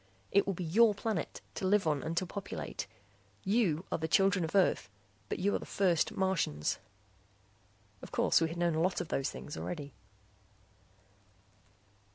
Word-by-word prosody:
"It 200 Hz, -, +4 dB
will 195 Hz, -, 0 dB
be 180 Hz, -, -4 dB
your 210 Hz, +6 st, +5 dB
planet, 205 Hz, -5 st, -3 dB
to 190 Hz, -, -2 dB
live 205 Hz, 0 st, +3 dB
on 150 Hz, -3 st, +1 dB
and 165 Hz, +1 st, -4 dB
to 185 Hz, -, +2 dB
populate. 195 Hz, +2 st, -5 dB, 0.6 s
You 195 Hz, -5 st, +2 dB
are -, -, 0 dB
the 160 Hz, -, -1 dB
children 195 Hz, +2 st, +3 dB
of 160 Hz, +4 st, -3 dB
Earth 185 Hz, -, +3 dB, 0.4 s
but -, -, -1 dB
you 200 Hz, +3 st, +1 dB
are -, -, +1 dB
the -, -, -8 dB
first 180 Hz, -5 st, +2 dB
Martians." 180 Hz, -, 0 dB, 1.2 s
Of -, -, -10 dB
course -, -, +3 dB
we 165 Hz, -, +3 dB
had 165 Hz, +2 st, -6 dB
known 170 Hz, -1 st, +2 dB
a 160 Hz, -, +1 dB
lot 180 Hz, +2 st, +1 dB
of 160 Hz, -, -4 dB
those 135 Hz, -, 0 dB
things 145 Hz, -, -7 dB
already. 145 Hz, -5 st, -5 dB
180 Hz, 170 wpm, -32 LUFS, 160-195 Hz, 1.2 s, your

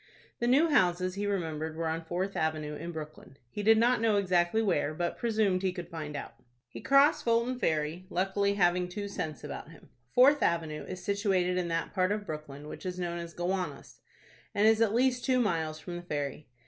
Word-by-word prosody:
The 240 Hz, -, 0 dB
new 280 Hz, +7 st, +5 dB
houses 185 Hz, -, +2 dB
he 205 Hz, +1 st, -3 dB
remembered 160 Hz, -5 st, -2 dB
were 165 Hz, 0 st, -2 dB
on 160 Hz, +1 st, -2 dB
Fourth 185 Hz, +4 st, -2 dB
Avenue, 155 Hz, -1 st, -1 dB
in 170 Hz, +3 st, -6 dB
Brooklyn. 155 Hz, -4 st, -9 dB
He 210 Hz, -, -4 dB
did 220 Hz, +2 st, +5 dB
not 240 Hz, +1 st, +3 dB
know 225 Hz, -2 st, +3 dB
exactly 185 Hz, 0 st, +2 dB
where, 155 Hz, -6 st, 0 dB
but 175 Hz, +1 st, -2 dB
presumed 215 Hz, -5 st, +1 dB
he 190 Hz, -1 st, +1 dB
could 175 Hz, -2 st, -7 dB
find 155 Hz, -3 st, -6 dB
out. -, -, -6 dB, 0.4 s
He -, -, -9 dB
crossed 275 Hz, +3 st, +4 dB
Fulton 235 Hz, +2 st, +1 dB
Ferry, 160 Hz, 0 st, -1 dB
luckily 200 Hz, +2 st, 0 dB
having 180 Hz, -1 st, +2 dB
two 200 Hz, +2 st, -5 dB
cents 155 Hz, -7 st, -5 dB
about -, -, -7 dB
him. -, -, -16 dB, 0.2 s
Fourth 280 Hz, +4 st, +6 dB
Avenue 160 Hz, -3 st, 0 dB
is 185 Hz, -1 st, -7 dB
situated 195 Hz, -3 st, +1 dB
in 180 Hz, -1 st, 0 dB
that 165 Hz, 0 st, -2 dB
part 185 Hz, 0 st, +1 dB
of 210 Hz, 0 st, -2 dB
Brooklyn 150 Hz, -3 st, -7 dB
which -, -, -8 dB
is 180 Hz, -1 st, -4 dB
known 175 Hz, -1 st, -3 dB
as 170 Hz, 0 st, -8 dB
Gowanus, 175 Hz, -4 st, -3 dB, 0.6 s
and 205 Hz, +2 st, +4 dB
is 225 Hz, 0 st, +4 dB
at 225 Hz, -1 st, +3 dB
least 250 Hz, 0 st, +2 dB
two 255 Hz, -2 st, +2 dB
miles 165 Hz, -8 st, 0 dB
from 175 Hz, +2 st, -6 dB
the -, -, -6 dB
ferry. 145 Hz, -3 st, -4 dB
180 Hz, 200 wpm, -30 LUFS, 160-210 Hz, 0.6 s, Fourth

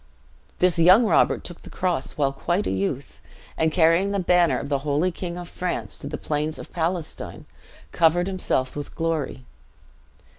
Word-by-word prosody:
This 180 Hz, -2 st, +2 dB
young 185 Hz, +8 st, +7 dB
Robert -, -, +3 dB
took 175 Hz, -, -6 dB
the -, -, -12 dB
cross 175 Hz, -7 st, -1 dB
while 140 Hz, -2 st, 0 dB
quite 175 Hz, +8 st, -1 dB
a -, -, -1 dB
youth; 100 Hz, +8 st, -3 dB, 0.3 s
and 160 Hz, 0 st, +1 dB
carrying 165 Hz, +4 st, +3 dB
the 200 Hz, 0 st, -1 dB
banner 180 Hz, -1 st, +3 dB
of -, -, -5 dB
the 140 Hz, -1 st, 0 dB
holy 150 Hz, +5 st, 0 dB
King 175 Hz, 0 st, -5 dB
of 175 Hz, -1 st, -7 dB
France 180 Hz, 0 st, -3 dB
to -, -, -7 dB
the -, -, -4 dB
plains 150 Hz, +1 st, -2 dB
of -, -, -10 dB
Palestine, 170 Hz, -1 st, -3 dB, 0.5 s
covered 170 Hz, +2 st, +3 dB
himself 180 Hz, -9 st, -1 dB
with 145 Hz, -1 st, -6 dB
glory. 160 Hz, -6 st, -2 dB
165 Hz, 170 wpm, -24 LUFS, 145-180 Hz, 0.5 s, young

